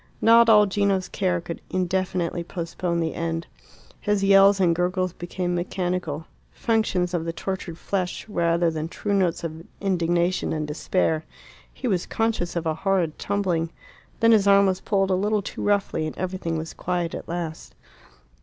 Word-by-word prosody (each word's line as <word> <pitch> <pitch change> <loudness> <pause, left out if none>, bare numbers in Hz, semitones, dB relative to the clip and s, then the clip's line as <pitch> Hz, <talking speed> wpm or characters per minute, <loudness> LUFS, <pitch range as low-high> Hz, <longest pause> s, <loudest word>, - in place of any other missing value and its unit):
Not 230 +1 +6
all 210 -1 +7
Gino's 195 -1 +1
care 180 -3 0
could 170 0 -7
indefinitely 185 -2 -1
postpone 170 0 -3
the 160 -1 -1
end. 165 0 -3 0.5
His 205 -2 0
yells 195 0 +6
and 175 -3 +3
gurgles 180 +1 0
became 175 0 -3
mechanical 175 -3 -2 0.3
functions 205 -6 0
of 170 -2 0
the 165 - -2
tortured 175 -1 -5
flesh 185 +1 -3
rather 170 -3 +1
than 155 0 -3
true 205 +4 -3
notes 185 -4 +1
of 165 0 -5 0.2
indignation 175 -1 +1
and 155 -1 -2
despair. 160 +1 0 0.5
He 255 - -5
was 185 -6 0
conscious 225 -7 -1
of 170 -1 -2
a 160 - +1
horrid 175 -1 0
tumbling. 185 -5 0 0.5
Then 230 0 +6
his 210 -3 +5
arm 200 0 +6
was 190 -1 0
pulled 195 -2 +1
a - - +4
little 205 +2 +1
too - - -6
roughly, 200 -6 +1
and 155 - -7
everything 180 -3 -2
was 160 0 -5
quiet 175 -2 -2
at - - -7
last. 170 -2 -5
180 Hz, 165 wpm, -24 LUFS, 170-195 Hz, 0.5 s, all